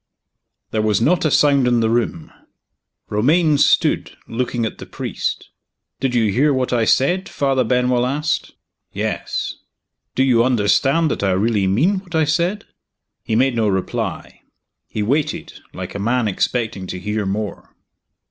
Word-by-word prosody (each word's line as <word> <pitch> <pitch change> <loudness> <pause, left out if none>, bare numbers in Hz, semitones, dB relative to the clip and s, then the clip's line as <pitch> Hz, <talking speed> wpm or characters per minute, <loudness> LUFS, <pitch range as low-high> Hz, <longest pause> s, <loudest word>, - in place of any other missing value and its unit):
THERE 110 - 0
was 105 -2 +2
not 160 +9 +2
a - - +3
sound 140 -3 +4
in 120 -1 +3
the 115 - +2
room. 115 -9 -1 0.8
Romayne 150 +8 +3
stood, - - +2
looking 120 0 -2
at 110 - -5
the - - -9
priest - - -4 0.5
"Did 130 -2 -1
you 110 -4 +2
hear 140 +8 +3
what 130 -2 0
I 115 -2 +2
said?" 175 +12 +2
Father 135 -2 +1
Benwell 125 0 +1
asked. 150 +4 -2 0.4
"Yes." - - -3 0.6
"Do 130 - +3
you 120 -3 +4
understand 135 +7 +2
that - - -3
I 95 -2 +2
really 100 0 +1
mean 160 - +2
what 180 -3 -9
I 160 - +3
said?" 175 +6 0 0.6
He 110 - -2
made 130 +2 +2
no 110 -2 +1
reply 95 -2 -3 0.5
he 105 - -3
waited, 140 +7 -2
like - - -7
a 100 - -5
man 120 +2 +1
expecting 105 -1 -2
to 90 - -5
hear 105 +1 -2
more. 105 +2 -5
125 Hz, 155 wpm, -20 LUFS, 110-140 Hz, 0.8 s, sound